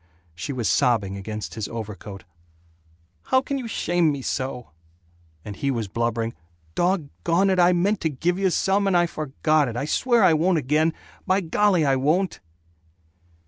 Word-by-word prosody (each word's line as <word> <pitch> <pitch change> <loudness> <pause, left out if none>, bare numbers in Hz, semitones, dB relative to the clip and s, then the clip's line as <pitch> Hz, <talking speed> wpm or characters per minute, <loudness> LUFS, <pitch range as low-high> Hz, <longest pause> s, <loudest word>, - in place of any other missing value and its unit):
She 85 - -5
was 125 -4 -2
sobbing 105 -6 +2
against 105 +2 -6
his 110 -3 -4
overcoat, 105 -3 -7 1.0
"How 260 - +3
can 275 +1 -3
you 245 - -5
shame 175 -6 +1
me 140 -2 -5
so?" 125 -7 -4 0.7
and 105 - -6
he 140 - -2
was 115 -5 -2
blubbering, 115 +2 -2 0.4
"Dog 175 - 0
gone 185 +4 +2
it, 185 - +1
I 175 0 +6
meant 190 +4 +1
to 160 - +1
give 170 +6 -1
you 195 -1 +2
some, 195 +3 +1
and 185 -2 +3
I 175 - +4
forgot 155 -1 0
it. 120 -1 -5
I 135 - -2
swear 235 +8 +2
I 180 -3 +6
won't 170 +3 +2
again. 155 +3 +1 0.3
By 190 +1 +3
golly 185 -1 +2
I 135 -1 +2
won't!" 165 +8 0
155 Hz, 170 wpm, -24 LUFS, 120-185 Hz, 1.0 s, I